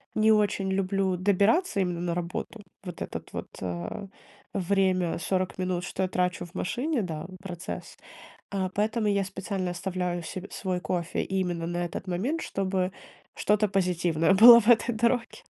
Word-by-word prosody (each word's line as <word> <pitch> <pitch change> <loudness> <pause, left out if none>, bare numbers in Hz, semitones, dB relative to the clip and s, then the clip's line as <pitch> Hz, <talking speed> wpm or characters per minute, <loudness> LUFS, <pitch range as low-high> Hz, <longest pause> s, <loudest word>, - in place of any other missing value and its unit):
не 220 0 +4
очень 205 -2 +1
люблю 190 -1 0
добираться 200 - +2
именно 175 -2 -1
на 175 -1 -1
работу. 175 +5 -4 0.2
Вот 180 -3 -8
этот - - -6
вот, - - -5
а, 90 - -4 0.5
время 185 -3 +1
40 185 +2 -1
минут, 180 -1 -1
что 190 - -4
я 185 - 0
трачу 180 -1 0
в 175 - -17
машине, 250 - -1
да, 160 -2 -5 0.2
процесс, 180 -1 -7 0.6
э, 190 -1 0
поэтому 220 +2 0
я 200 -1 +2
специально 190 -1 -3
оставляю 180 -1 -3
се 185 +3 -6
свой 185 -2 -2
кофе 170 +1 -2
именно 180 -3 -2
на 175 0 -2
этот 175 - -6
момент, 240 - -1
чтобы 190 -1 -1 0.4
что-то 210 0 +2
позитивное 180 -2 +2
было 235 +3 +11
в 210 - -7
этой 240 0 +5
дороге. 235 +1 0
185 Hz, 155 wpm, -27 LUFS, 175-205 Hz, 0.6 s, было